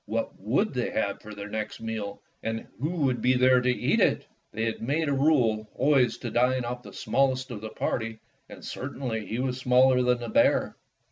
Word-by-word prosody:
What - - -2
would 135 - 0
they 125 -2 -1
have 100 -2 -2
for 110 0 -10
their 100 0 -7
next 110 0 -4
meal, 110 -3 -5 0.2
and 115 0 -3
who 150 +5 -1
would 140 -8 0
be 130 +1 +3
there 125 0 +5
to 125 - +1
eat 125 - +1
it? - - +2 0.3
They 110 - -3
had 115 - -3
made 150 +7 0
a - - +1
rule 125 -7 +2
always 135 -2 +3
to - - -5
dine 125 +1 +2
oflE 120 +1 -4
the - - -12
smallest 130 -1 0
of 105 -4 -6
the 110 - -5
party, 110 0 -3 0.3
and - - -11
certainly 125 -5 -4
he 115 - -3
was 130 0 -2
smaller 125 0 +4
than 125 0 +2
the 120 -1 -5
bear. - - +3
125 Hz, 205 wpm, -27 LUFS, 110-130 Hz, 0.3 s, there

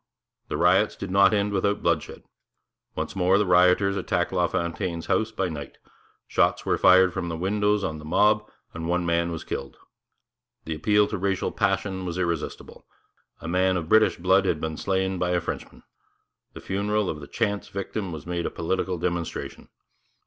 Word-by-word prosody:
The - - -3
riots - - +3
did 100 - -6
not 95 0 +5
end 105 -1 0
without 100 +1 0
bloodshed. 85 -3 -1 0.7
Once - - -4
more 95 +1 +3
the 105 - +2
rioters 90 +2 +4
attacked 90 -3 -1
LaFontaine's 85 -1 -1
house 110 0 0
by 95 -4 -1
night; 75 -5 -7 0.5
shots - - +1
were - - +2
fired 95 -1 +6
from 85 - -3
the 80 - -4
windows 105 +3 +1
on 80 -3 -3
the - - -11
mob, 105 +6 +2 0.2
and 80 0 -5
one 90 0 0
man 85 0 +1
was 80 - -5
killed. 70 -2 -6 0.9
The 80 - -3
appeal 105 +7 +3
to 105 - -3
racial 95 0 -1
passion 95 -2 -1
was 90 -1 -4
irresistible. 85 -3 -4 0.5
A - - -7
man 95 +2 +2
of 80 -2 -5
British 110 0 +4
blood 95 +2 +3
had - - 0
been 80 -1 -3
slain 95 +1 -1
by 90 0 0
a 90 - +2
Frenchman. 85 - -7 0.7
The - - -10
funeral 105 +1 -1
of 75 - -3
the 70 - -10
chance 105 -3 -2
victim 100 -1 -4
was 80 -3 -7
made 85 0 -2
a - - -2
political 90 +2 -2
demonstration. 85 -1 -4
90 Hz, 175 wpm, -25 LUFS, 85-100 Hz, 0.9 s, fired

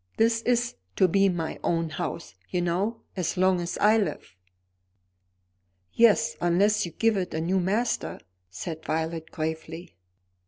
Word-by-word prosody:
This 230 0 +3
is 240 -1 +2 0.2
to 185 - +4
be 195 +2 +3
my 170 -3 -3
own 165 -1 0
house, 170 +1 -5 0.2
you 180 - -1
know, 185 +7 -1
as 180 -3 -2
long 185 -1 +3
as 175 - -4
I 215 +2 +5
live." 200 - -4 1.6
"Yes; 230 0 +4
unless 200 +3 +3
you - - -8
give 225 -1 +2
it 180 -3 -3
a - - -1
new 180 +4 +1
master," 210 +7 -1 0.3
said 160 - -6
Violet 160 +1 -2
gravely. 160 - -5
180 Hz, 145 wpm, -26 LUFS, 165-210 Hz, 1.6 s, I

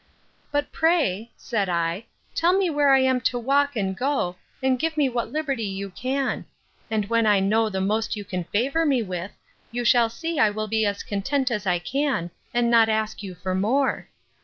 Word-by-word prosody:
—But 290 0 -1
pray, 280 - +1
said 205 -5 -2
I, 170 +5 -1 0.3
tell 350 +3 +3
me 375 -3 +1
where 290 -2 +3
I 270 -1 +6
am 260 -1 +2
to 245 +1 0
walk 280 +3 +1
and 195 -3 -1
go, 250 -8 -1 0.3
and 260 -1 +2
give 320 +1 -1
me 285 -3 +3
what 240 -1 -3
liberty 285 -5 -2
you 195 -1 -4
can; 265 +7 -2 0.4
and 215 -2 0
when 230 +1 +2
I 205 -2 +5
know 215 +3 +2
the 190 -2 -2
most 215 +3 0
you 205 -1 -6
can 180 -2 -4
favour 270 - 0
me 270 -6 +2
with, 185 -1 -4 0.4
you 240 +1 -3
shall 235 -1 +5
see 325 +7 -4
I 215 - +5
will 215 +1 -3
be 220 0 +1
as 200 0 -2
content 255 +6 -1
as 210 -4 -2
I 180 -1 +3
can, 210 - -1 0.2
and 240 0 +1
not 225 -1 +5
ask 220 -1 -1
you 190 -3 -7
for 185 +2 -3
more. 240 +9 0
230 Hz, 200 wpm, -24 LUFS, 200-275 Hz, 0.4 s, I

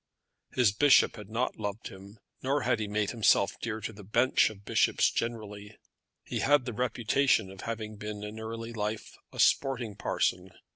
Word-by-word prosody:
His 125 -5 +4
bishop 140 +7 +5
had 105 -2 -10
not 120 +4 -2
loved 105 0 -4
him, 100 +3 -13 0.2
nor 140 +2 0
had 110 - +1
he 105 - -2
made 105 0 -1
himself 105 -3 +2
dear 110 -2 -3
to 110 - -5
the 105 0 -12
bench 115 +6 +3
of 100 -2 -13
bishops - - +2
generally. 105 -3 -5 0.5
He - - -4
had 145 -2 +3
the 120 - -4
reputation 120 -2 +1
of 95 - -11
having 110 -2 -5
been 105 0 -6
in 105 +1 -7
early 115 +1 -6
life 105 0 -4 0.2
a - - -11
sporting 125 -6 +2
parson. 95 -2 -1
110 Hz, 175 wpm, -29 LUFS, 105-120 Hz, 0.5 s, bishop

